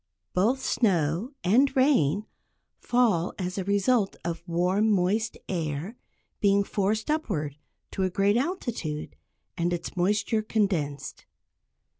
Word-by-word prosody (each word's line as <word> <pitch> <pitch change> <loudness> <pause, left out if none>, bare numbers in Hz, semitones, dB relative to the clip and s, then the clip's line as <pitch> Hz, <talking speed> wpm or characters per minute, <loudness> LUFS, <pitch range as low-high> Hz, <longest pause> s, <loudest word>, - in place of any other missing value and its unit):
Both 230 +9 +2
snow 180 - +1
and 245 +10 +3
rain 230 - +3 0.5
fall 220 -9 +1
as 185 0 -3
a - - -1
result 200 +2 +2
of 170 -1 -3
warm 180 +5 +2
moist 210 +3 +1
air 165 - -3 0.4
being 200 0 +3
forced 210 +6 -1
upward 165 - -2 0.4
to - - -3
a 185 - +2
great 200 +3 +2
altitude, 240 - -3 0.4
and 170 +1 +1
its 170 +1 -4
moisture 205 +4 +1
condensed. 165 -11 -2
195 Hz, 115 wpm, -27 LUFS, 175-220 Hz, 0.5 s, and